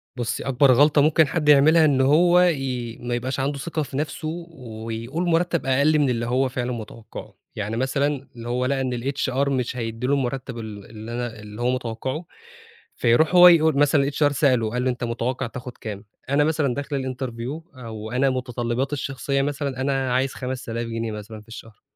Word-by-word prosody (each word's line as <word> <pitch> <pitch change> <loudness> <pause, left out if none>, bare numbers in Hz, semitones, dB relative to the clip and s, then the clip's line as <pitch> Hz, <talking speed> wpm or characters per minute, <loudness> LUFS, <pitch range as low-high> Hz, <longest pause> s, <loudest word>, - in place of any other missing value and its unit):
بُصي 120 -2 -3
أكبر 135 +1 +4
غلطة 145 +3 +5
ممكن 155 +1 +4
حد 150 0 0
يعملها 155 +3 +6
إن 135 -3 +3
هو 175 +6 +5
ي 130 -9 0
ما 120 0 -2
يبقاش 130 +2 -3
عنده 140 +2 -1
ثقة 160 +1 -2
في 135 -1 -6
نفسه 155 +1 -3 0.2
ويقول 115 +3 -5
مرتب 170 -1 +1
أقل 140 +4 +3
من 140 -3 +3
اللي 115 -1 -1
هو 130 +2 +1
فعلًا 125 0 -3
متوقعه، 115 -1 -8 0.2
يعني 105 +2 -3
مثلًا 140 +2 -1 0.2
هو 125 +1 -1
لقى 135 0 0
إن 130 -1 -1
الHR 140 0 0
مش 125 -2 -1
هيدِّي 115 +1 -3
له 140 - +2
المرتب 130 -2 -2
ال 105 -3 -7
اللي 110 +1 -9
أنا 120 -1 -4
اللي 105 +2 -9
هو 120 - +2
متوقعه 130 +5 -3 0.7
فيروح 140 +8 +3
هو 180 0 +10
يقول 160 -3 +5
مثلًا 145 -1 +3
الHR 145 0 +2
سأله، 130 -6 +2
قال 125 +2 -1
له 130 - +1
أنت 125 0 -3
متوقع 120 +2 -2
تاخد 125 +1 -8
كام؟ 105 -1 -7 0.2
أنا 145 +1 +3
مثلًا 150 -4 +1
داخل 140 0 -3
الInterview 130 +6 -6
آآ 125 -2 -9
وأنا 110 +5 -1
متطلباتي 125 +1 -2
الشخصية 140 0 -1
مثلًا 140 -2 -2
أنا 135 -2 0
عايز 130 +1 +1
5000 125 -2 -4
جنيه 115 0 -3
مثلًا 105 +1 -8
في 105 - -23
الشهر، 115 -2 -12
130 Hz, 185 wpm, -23 LUFS, 120-145 Hz, 0.7 s, هو